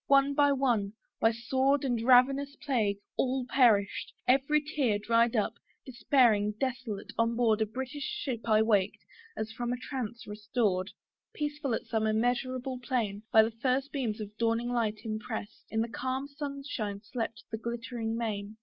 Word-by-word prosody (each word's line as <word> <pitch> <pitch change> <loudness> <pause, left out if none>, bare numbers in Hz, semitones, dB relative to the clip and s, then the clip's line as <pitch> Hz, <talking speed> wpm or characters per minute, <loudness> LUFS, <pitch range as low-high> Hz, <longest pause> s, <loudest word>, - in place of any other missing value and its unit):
one 275 0 +5
by 285 0 +4
one, 240 -7 +1 0.3
by 225 - +4
sword 265 +4 +1
And 240 -3 0
ravenous 270 +3 +4
plague, 225 -10 0 0.2
all 260 -1 0
perished: 220 -7 +3 0.2
every 275 +4 +4
tear 285 -7 0
Dried 230 +3 +2
up, 220 0 +1 0.3
despairing, 235 -5 +3
desolate, 255 -6 -3
on 230 0 +2
board 225 -2 +2
A 220 - +2
British 265 +6 -5
ship 235 -4 -4
I 215 0 +5
waked, 205 -3 +1 0.3
as 220 +1 -3
from 240 +1 -3
a 250 - -1
trance 245 -3 -5
restored. 210 -2 -1 0.5
Peaceful 295 -4 -2
as - - -6
some 220 -1 0
immeasurable 250 +3 0
plain 230 -5 -2
By 220 - +8
the 225 - -1
first 260 +4 -1
beams 235 -7 -2
of 210 -1 -7
dawning 230 +1 +1
light 225 -3 -1
impress'd, 215 -1 -5
In 220 - 0
the 230 - 0
calm 260 +3 -3
sunshine 280 -8 -5
slept 225 0 -4
the 220 - -3
glittering 235 -1 -3
main. 215 -2 -3
235 Hz, 160 wpm, -30 LUFS, 220-265 Hz, 0.5 s, By